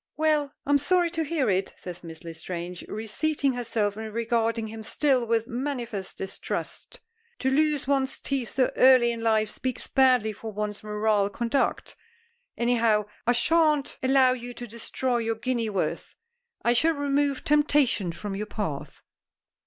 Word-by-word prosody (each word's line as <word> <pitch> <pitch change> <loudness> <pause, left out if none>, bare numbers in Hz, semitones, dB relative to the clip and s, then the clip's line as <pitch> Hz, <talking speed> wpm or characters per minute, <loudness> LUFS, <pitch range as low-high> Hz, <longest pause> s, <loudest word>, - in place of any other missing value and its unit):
"Well, 305 -2 +2
I'm 285 0 +4
sorry 345 +3 +2
to 325 -1 -1
hear 310 -3 0
it," 190 -1 0
says 180 -1 -8
Miss 165 0 -10
L'Estrange 170 +2 -6
reseating 270 +6 -1
herself 225 -4 -1
and 220 0 -6
regarding 230 0 0
him 220 0 -7
still 255 +2 +1
with 225 0 +1
manifest 240 -6 -4
distrust. 190 0 -5 0.4
"To 265 - 0
lose 300 0 +2
one's 270 -1 +1
teeth 270 -4 -2
so 255 -1 +2
early 255 -2 +6
in 230 -1 -5
life 220 -2 +2
speaks 255 -1 -4
badly 255 -5 +3
for 220 +1 -7
one's 210 0 -4
moral 210 -1 +1
conduct. 235 +5 -1 0.6
Anyhow, 230 -3 +2 0.2
I 245 - +5
shan't 300 +2 +2
allow 260 -1 +5
you 245 -1 -7
to 240 - -6
destroy 240 +2 -2
your 225 -1 -1
guinea's 235 -1 -1
worth. 195 -3 -3 0.5
I 240 - +4
shall 320 +7 +3
remove 285 -1 0
temptation 290 - +2
from 195 +4 -5
your 210 +2 -4
path." 180 -11 -5
235 Hz, 150 wpm, -26 LUFS, 215-275 Hz, 0.6 s, early